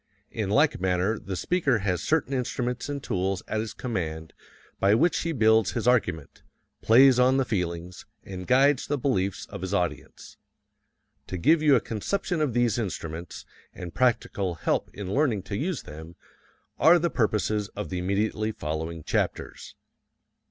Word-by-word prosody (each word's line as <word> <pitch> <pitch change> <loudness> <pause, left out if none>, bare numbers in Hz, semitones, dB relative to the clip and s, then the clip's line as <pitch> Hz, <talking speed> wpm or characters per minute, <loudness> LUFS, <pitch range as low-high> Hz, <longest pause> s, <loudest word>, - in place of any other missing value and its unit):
In 110 -4 -3
like 145 - +2
manner 95 +3 0
the 95 - -6
speaker 140 - +1
has 95 -4 -1
certain 155 -3 0
instruments 125 0 -2
and 140 -1 -4
tools 95 -3 -2
at 110 - -2
his 110 0 -4
command 80 -9 -4 0.5
by 100 +2 +4
which 165 +8 +2
he 165 - -2
builds 110 - +3
his 115 0 -2
argument, 90 - 0 0.4
plays 125 +2 +6
on 130 +1 +4
the 135 - +1
feelings, 90 -4 -4 0.2
and 90 -2 -8
guides 135 +1 +3
the 145 - 0
beliefs 100 -8 -1
of - - -7
his 95 +2 -2
audience. 90 -3 -4 0.9
To 95 - -4
give 155 - +3
you 150 -3 +5
a - - +4
conception 175 - -2
of 140 -6 0
these 120 -2 +2
instruments, 85 -4 -5 0.3
and 90 -3 -8
practical 100 -6 0
help - - -1
in 100 -1 -6
learning 130 -10 +1
to 100 - -5
use 165 - -2
them, 80 +3 -10 0.6
are 165 +4 +7
the 170 -1 0
purposes 105 -2 0
of 105 - -5
the 90 - -3
immediately 105 +4 -1
following 80 -3 -5
chapters. - - -3
110 Hz, 160 wpm, -26 LUFS, 90-130 Hz, 0.9 s, are